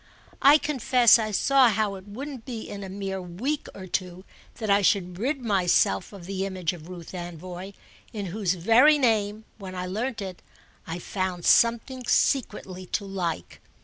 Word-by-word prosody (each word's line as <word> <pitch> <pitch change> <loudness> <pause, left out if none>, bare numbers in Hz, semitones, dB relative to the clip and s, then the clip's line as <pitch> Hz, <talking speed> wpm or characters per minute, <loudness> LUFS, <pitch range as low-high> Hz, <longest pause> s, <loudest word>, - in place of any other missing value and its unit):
I 285 +2 +8
confess 250 -5 +4
I 215 -1 -1
saw 260 +4 +4
how 215 -1 0
it 190 0 -10
wouldn't 260 +4 -7
be 230 -3 -6
in 200 -1 -7
a 190 - -7
mere 195 0 -4
week 225 - -3
or 190 - -8
two 185 0 -4 0.3
that 220 - -5
I 200 0 +4
should 180 -2 +1
rid 270 +5 -1
myself 180 - +2
of 195 -4 -11
the 190 +1 -3
image 185 -3 -2
of 170 -1 -11
Ruth 175 -3 -9
Anvoy, 180 +2 -7 0.4
in 210 -3 -5
whose 195 -4 0
very 230 - +5
name, 220 -4 +1
when 190 -2 -8
I 180 0 -3
learnt 225 +6 -3
it, 190 -3 -6 0.5
I 165 - -4
found 185 -1 -3
something 235 +2 +3
secretly 190 -8 0
to 200 - -2
like. 175 - -4
200 Hz, 170 wpm, -26 LUFS, 180-230 Hz, 0.5 s, I